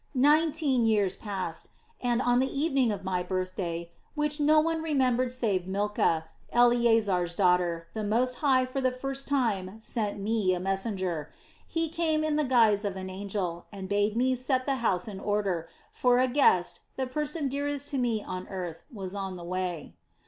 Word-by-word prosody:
"Nineteen 295 -1 +3
years 205 -4 +2
passed 185 -6 -5 0.3
and, 245 0 +1
on 245 0 +3
the 265 +1 +1
evening 275 -5 +1
of 200 -2 -4
my 185 -1 -1
birthday, 180 -2 -3 0.2
which 300 0 0
no 305 +1 +5
one 325 +1 0
remembered 255 -5 +1
save 210 -8 -1
Milcah, 195 -5 0 0.3
Eleasar's 225 -7 +3
daughter, 180 -3 +2
the 220 - -3
Most 245 +4 +1
High 260 -3 +3
for 255 +1 -3
the 255 -1 +2
first 270 +2 -4
time 220 -8 0
sent 215 -2 -2
me 200 -2 +1
a - - -3
messenger. 190 -4 -2 0.4
He 330 0 -1
came 315 -1 0
in 310 -1 +1
the 305 - +2
guise 225 -6 +4
of 200 -2 -2
an 185 0 -6
angel, 190 -3 -4
and 195 -2 -7
bade 205 +2 +1
me 255 +2 +3
set 255 +1 0
the 275 -2 0
house 195 -6 0
in 200 -3 -6
order; 195 -5 -1 0.2
for 245 -1 +3
a 255 +1 +4
guest, 185 -10 +3 0.2
the 265 - -1
person 300 +3 -2
dearest 285 +1 -2
to 275 - -1
me 230 -4 0
on 185 0 -6
earth, 180 -4 -5
was 195 -5 -6
on 195 -2 -4
the 175 - -8
way. 180 -3 -4
220 Hz, 175 wpm, -28 LUFS, 185-260 Hz, 0.4 s, no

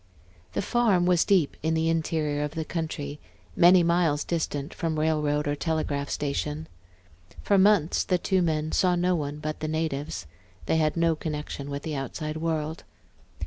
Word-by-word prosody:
The - - -1
farm 210 -6 +2
was 180 -2 +4
deep 185 -8 +2
in 160 +1 0
the 160 0 +1
interior 155 -2 0
of 150 +2 -4
the 160 -1 -2
country, 150 -3 -4 0.4
many 175 +1 +6
miles 170 -3 +2
distant 155 -3 -3
from 165 -2 -2
railroad 150 -1 +1
or 145 - 0
telegraph 145 -3 -2
station. 150 +2 -2 0.8
For 200 -1 +3
months 190 -5 +4
the 180 - +1
two 190 +1 +1
men 155 -2 0
saw 180 -1 +3
no 180 +1 +2
one 145 -2 -3
but 155 0 -4
the 155 - -3
natives; 155 - -2 0.4
they - - +1
had 155 0 +1
no 165 -1 +3
connection 150 -2 -5
with 140 0 -5
the 160 - -4
outside 155 +3 -4
world. 160 0 -2
160 Hz, 165 wpm, -26 LUFS, 150-170 Hz, 0.8 s, many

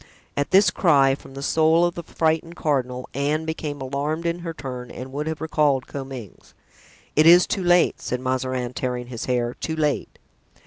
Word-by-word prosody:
At 145 - -1
this 195 +2 +5
cry 140 -6 +4
from 135 0 -10
the 140 - -6
soul 160 +3 +3
of 175 - 0
the 170 - -6
frightened 165 +1 -1
cardinal, 130 -5 -1
Anne 150 +3 0
became 155 -2 -4
alarmed 145 +5 -2
in 170 +1 -1
her 170 -1 -5
turn 125 -5 -7
and 130 +1 -8
would 150 +2 -3
have 160 0 -4
recalled 150 -4 +1
Comminges. 135 -7 -9 0.6
"It 155 +2 +5
is 175 +2 +8
too 195 - -2
late," 175 0 +3
said 125 - -3
Mazarin, 130 -1 -2
tearing 125 -1 -3
his 120 -3 -5
hair, 120 -1 0
"too 160 - -4
late!" 150 -2 -1
145 Hz, 180 wpm, -23 LUFS, 130-160 Hz, 0.6 s, is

